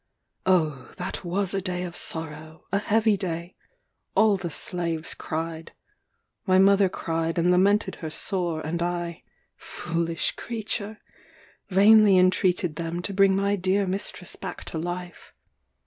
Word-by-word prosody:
Oh, 155 -8 +1
that 180 +2 -5
was 185 +2 -1
a 195 - 0
day 180 -1 -2
of 175 -1 -6
sorrow, 160 0 -5
a 200 - +2
heavy 215 +1 +2
day! 175 -2 -4 0.6
All 215 -2 +5
the 185 -3 -4
slaves 165 -1 -3
cried. 160 0 -5 0.7
My 185 0 +5
mother 195 0 +5
cried 165 -1 -2
and 175 +1 +3
lamented 200 +4 +3
her 160 - -5
sore; 175 -1 -1
and 170 +2 -2
I 175 -1 -2 0.3
(foolish 170 -1 -2
creature!) 220 -2 -4 0.7
vainly 205 +1 +6
entreated 180 -3 +2
them 170 +1 -3
to 200 - -3
bring 195 0 +4
my 200 +1 +1
dear 195 +1 +1
mistress 185 -1 -3
back - - -7
to 160 - -2
life. 175 +1 -6
180 Hz, 135 wpm, -25 LUFS, 165-195 Hz, 0.7 s, vainly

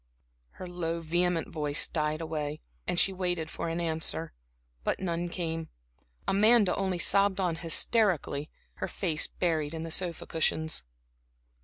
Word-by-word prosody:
Her 185 - -8
low, 170 -1 -2
vehement 175 +1 +1
voice 150 -2 +1
died 155 0 -1
away, 155 -2 -3 0.3
and 180 -1 +2
she 195 - +5
waited 180 -4 -2
for - - -3
an 165 +1 -2
answer; 160 - 0 0.5
but - - 0
none 175 -1 -2
came. 165 -2 -3 0.6
Amanda 210 -1 +5
only 190 -2 0
sobbed 200 +2 +3
on 175 -4 +1
hysterically, 165 -3 +1 0.3
her - - -2
face 165 -5 0
buried 160 -3 -1
in 160 - -4
the 165 - -6
sofa 175 -1 0
cushions. 160 - 0
165 Hz, 140 wpm, -29 LUFS, 160-180 Hz, 0.6 s, she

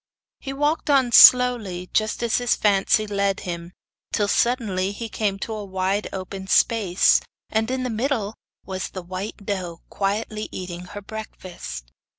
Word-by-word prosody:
He 270 - -6
walked 295 +3 -1
on 265 -4 +4
slowly, 230 -8 +6
just 215 +2 0
as 235 - +2
his 245 -1 +2
fancy 205 +1 +2
led 200 -1 -1
him, 170 -1 -6 0.4
till, 205 -2 +1
suddenly, 200 -5 +1
he 230 +3 -5
came 205 -2 -1
to 220 +3 -5
a 215 -1 -5
wide 190 +1 -1
open 190 0 -6
space, 200 -4 +3 0.3
and 220 +1 0
in 260 0 -1
the 250 - -2
middle 225 -2 -1 0.3
was 185 -1 -4
the 185 - -7
white 190 +3 -6
doe 180 -5 -4
quietly 210 +2 -2
eating 180 -1 -6
her 205 +2 -9
breakfast. 180 - -8
205 Hz, 155 wpm, -23 LUFS, 185-225 Hz, 0.4 s, slowly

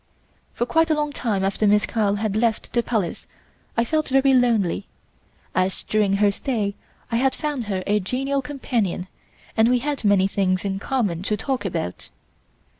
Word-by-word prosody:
For 240 - -1
quite 325 +5 +2
a 310 - +3
long 295 -1 -1
time 210 -8 -1
after 200 +2 +1
Miss 210 0 +4
Carl 210 -3 +1
had 210 -1 -1
left 225 0 0
the 240 - +3
Palace 220 -7 -2 0.5
I 230 - +3
felt 310 +4 0
very 270 0 +4
lonely, 225 -7 +2 0.7
as 185 +1 0
during 210 -2 +1
her 200 0 +4
stay 210 -2 -2 0.4
I 230 - +2
had 265 +2 +2
found 295 -6 -3
her 190 -3 -2
a 210 +1 +2
genial 270 +8 -1
companion 240 -9 -2 0.5
and 220 +1 +4
we 250 - +4
had 280 +1 -3
many 200 -2 +4
things 185 -1 0
in 195 -1 -1
common 205 -8 -1
to 210 +2 -1
talk 260 -2 -2
about. 90 - -4
220 Hz, 175 wpm, -23 LUFS, 200-260 Hz, 0.7 s, Miss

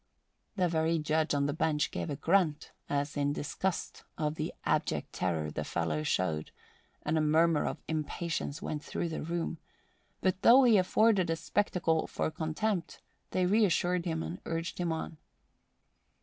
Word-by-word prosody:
The 185 -3 +2
very 165 0 +1
Judge 155 0 +1
on 140 0 +2
the 145 - 0
bench 155 -2 0
gave 85 -1 -3
a - - -2
grunt 160 0 +1 0.2
as 145 +1 -1
in 145 0 +1
disgust 175 +5 -3
of 150 -1 0
the 155 0 -3
abject - - 0
terror 80 -4 -1
the 75 - -3
fellow 80 -1 -1
showed, 80 -1 0 0.5
and 155 +1 +1
a - - +2
murmur 155 +1 +3
of - - -5
impatience 160 +1 -3
went 150 -5 -3
through 170 - -3
the 160 - -4
room; 170 0 -3 0.6
but 185 0 0
though 255 +3 +8
he 230 -5 +6
afforded 195 -1 +3
a 165 - +2
spectacle 165 -1 0
for - - -2
contempt, 170 +4 -2 0.3
they 185 - +1
reassured 180 -3 +2
him 160 -1 -1
and 175 - -6
urged 165 +1 -3
him 175 -2 0
on. 160 0 -4
160 Hz, 160 wpm, -31 LUFS, 150-180 Hz, 0.6 s, though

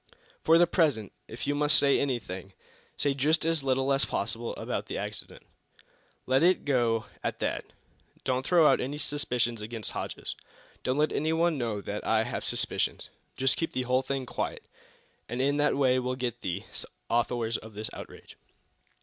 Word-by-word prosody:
For 165 - +6
the 175 - +7
present, 150 - +1 0.2
if 115 - -6
you 145 - +1
must 150 +1 +3
say 140 -1 +4
anything, 100 -8 -3 0.4
say 145 - +3
just 150 +4 +2
as 165 -2 +2
little 135 0 +2
as 135 - +3
possible 115 +3 -2
about - - -3
the - - -3
accident. - - -5 0.8
Let 130 +1 +3
it 180 +2 +4
go 120 -5 +2 0.2
at - - -1
that. - - -2 0.6
Don't 130 0 0
throw 170 +2 +5
out - - +5
any 140 +4 -3
suspicions 125 -6 -1
against 110 0 -5
Hodges. - - -4 0.5
Don't 130 +2 0
let 150 +1 +3
anyone 160 0 +1
know 110 -4 -1
that 105 +1 -4
I 110 0 +3
have - - -3
any - - -5
suspicions. - - -1 0.3
Just 135 0 +3
keep 165 - -2
the 130 - 0
whole 125 +1 +2
thing 135 0 -2
quiet - - -3 0.7
and 120 +2 -3
in 140 +2 +2
that 145 -1 +3
way 130 -2 +4
we'll 125 0 -1
get 125 -3 -3
the 95 +2 -3 0.4
authors 120 -1 +1
of 110 -1 -12
this 110 +1 -2
outrage." - - -10
130 Hz, 175 wpm, -29 LUFS, 115-145 Hz, 0.8 s, the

